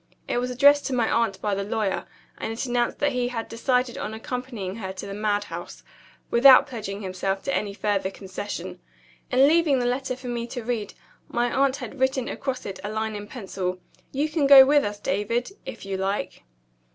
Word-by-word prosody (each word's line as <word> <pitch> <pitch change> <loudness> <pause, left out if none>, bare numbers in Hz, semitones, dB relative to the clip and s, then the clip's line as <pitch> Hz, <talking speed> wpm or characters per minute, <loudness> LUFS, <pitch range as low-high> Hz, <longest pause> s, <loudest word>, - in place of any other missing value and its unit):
It - - 0
was 250 +1 -2
addressed 285 +3 +5
to 270 - -2
my 235 -2 +1
aunt 225 -4 +1
by 210 - +1
the 200 0 -1
lawyer; 210 -1 -1 0.3
and 225 - -3
it 225 +4 -3
announced 240 -1 0
that 290 0 +1
he 250 -2 0
had 230 -2 -4
decided 250 +1 0
on 220 - -4
accompanying 225 -4 -5
her 190 -4 -5
to 190 - -7
the 200 - -6
madhouse 205 0 -3 0.5
without 260 +2 +8
pledging 210 -6 -6
himself 195 +1 -2
to 275 - -1
any 200 -1 -2
further 200 -3 0
concession. 190 -2 -6 0.5
In 265 +2 +5
leaving 315 -3 +4
the 245 - 0
letter 255 +1 -1
for 255 +1 -14
me 240 -1 -3
to 245 -1 -6
read, 225 -3 -3 0.3
my 240 0 0
aunt 275 0 +3
had 280 - -8
written 260 -1 +1
across 260 -2 -4
it 190 -1 -6
a 205 - -3
line 220 0 -2
in 205 0 -6
pencil: 190 -6 -4 0.3
"You 285 +3 0
can 305 -2 +1
go 275 -1 +11
with 290 +1 +4
us, 205 0 -3
David, 210 - -1 0.2
if - - -7
you 195 -1 -3
like." 195 +2 -3
235 Hz, 200 wpm, -25 LUFS, 205-260 Hz, 0.5 s, go